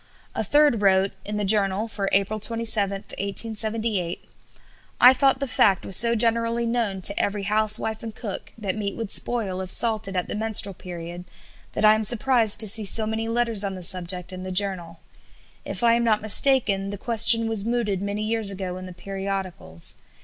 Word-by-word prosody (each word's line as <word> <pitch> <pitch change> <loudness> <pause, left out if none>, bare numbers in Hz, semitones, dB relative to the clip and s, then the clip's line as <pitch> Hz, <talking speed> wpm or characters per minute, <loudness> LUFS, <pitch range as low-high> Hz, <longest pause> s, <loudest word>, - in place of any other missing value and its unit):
A - - -3
third 290 -7 +2
wrote 195 0 +2
(in 210 +1 -5
the 210 - -2
Journal 200 +1 +1
for 205 -3 -4
April 200 +2 0
27, 220 -2 -2
1878): 215 -2 -4 0.7
"I 250 +1 +7
thought 265 0 +1
the 275 - -4
fact 200 -5 +1
was 190 - +2
so 235 +3 +3
generally 230 +1 0
known 230 -5 -3
to 200 - +2
every 200 0 -2
housewife 215 +1 0
and 225 -2 -9
cook 205 -5 -8
that 200 -4 -4
meat 200 -2 -5
would 225 -3 -5
spoil 200 -6 +2
if 185 - -7
salted 215 -3 +3
at 180 - -3
the - - -6
menstrual 210 -2 -1
period, 175 0 -10 0.5
that - - -1
I 215 - +6
am 215 0 -2
surprised 225 -1 +3
to 220 - +3
see 215 +2 +3
so 215 +2 +2
many 220 +1 -4
letters 230 -3 0
on 195 -1 -4
the 185 - -9
subject 180 +1 -2
in 185 - -8
the 185 0 -7
Journal. 180 -4 -2 0.7
If - - -6
I 230 -1 +4
am 235 0 0
not 215 -2 0
mistaken, 215 -3 +5
the 205 - -7
question 230 +1 +3
was 220 -3 0
mooted 225 -4 -2
many 200 +1 -4
years 220 -1 +2
ago 185 -2 -3
in 185 0 -9
the 180 - -11
periodicals. 190 - -6
210 Hz, 185 wpm, -23 LUFS, 195-230 Hz, 0.7 s, I